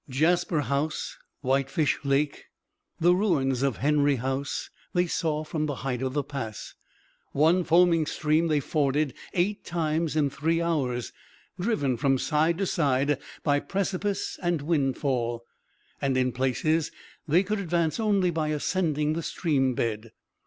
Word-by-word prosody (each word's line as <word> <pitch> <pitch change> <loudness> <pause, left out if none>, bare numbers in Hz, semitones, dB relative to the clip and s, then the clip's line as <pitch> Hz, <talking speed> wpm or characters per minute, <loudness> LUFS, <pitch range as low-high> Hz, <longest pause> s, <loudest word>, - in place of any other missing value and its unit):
Jasper 165 +4 +2
House, 140 +4 -2 0.3
Whitefish 140 +2 +1
Lake, 140 +1 0 0.5
the 175 +2 +5
ruins 145 - +1
of 135 -3 0
Henry 145 0 +3
House, 135 +3 -3 0.2
they 175 0 +3
saw 155 -3 -1
from 155 0 -2
the 145 - -2
height 125 -2 -1
of 130 -1 -2
the 145 0 0
pass. 130 -7 -6 0.6
One 165 +6 +4
foaming 170 -2 +4
stream 155 +2 +1
they 150 -2 +2
forded 145 -1 0 0.2
eight 195 +4 0
times 160 -1 -1
in 145 -3 +2
three 165 +4 0
hours, 135 -8 -1 0.5
driven 175 - 0
from 135 +1 +2
side 160 +4 +1
to 195 - 0
side 140 -4 +1 0.2
by 145 -2 +3
precipice 195 +3 -2
and 175 -5 0
windfall; 135 -6 0 0.6
and 135 -2 +1
in 130 0 +2
places 135 +6 0 0.4
they 170 +5 +4
could 210 +2 -2
advance 170 -1 0
only 200 -5 +2
by 160 -2 -1
ascending 150 -1 0
the 165 - -2
stream 135 -7 0
bed. 110 -1 -2
150 Hz, 140 wpm, -27 LUFS, 135-170 Hz, 0.6 s, the